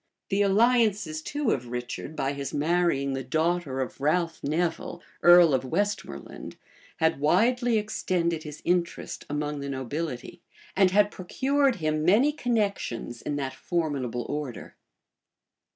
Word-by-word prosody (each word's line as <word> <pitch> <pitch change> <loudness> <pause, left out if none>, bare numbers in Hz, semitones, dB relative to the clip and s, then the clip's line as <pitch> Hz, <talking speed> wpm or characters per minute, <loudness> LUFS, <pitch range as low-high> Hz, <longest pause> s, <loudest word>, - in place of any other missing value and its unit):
The 195 0 +1
alliances 205 -5 +2
too 290 - -1
of 125 -2 -2
Richard, 125 +5 -5
by 135 -1 -1
his 140 -1 -5
marrying 150 -3 +1
the 135 0 -3
daughter 155 0 0
of 130 +1 -5
Ralph 165 +2 0
Nevil, 165 +3 -1 0.2
earl 175 -3 +7
of 130 - +1
Westmoreland, 200 +10 -3 0.4
had 160 -3 +1
widely 230 - +3
extended 180 -6 -1
his 150 -1 -9
interest 175 -1 -1
among 150 0 -2
the 140 0 -5
nobility, 135 0 -5 0.3
and 190 -1 +5
had 205 +2 +3
procured 270 +8 +1
him 155 -3 -1
many 215 - +4
connections 200 - -2
in 145 - -3
that 135 -2 -3
formidable 135 -8 -2
order. 145 -5 -5
165 Hz, 130 wpm, -27 LUFS, 140-200 Hz, 0.4 s, earl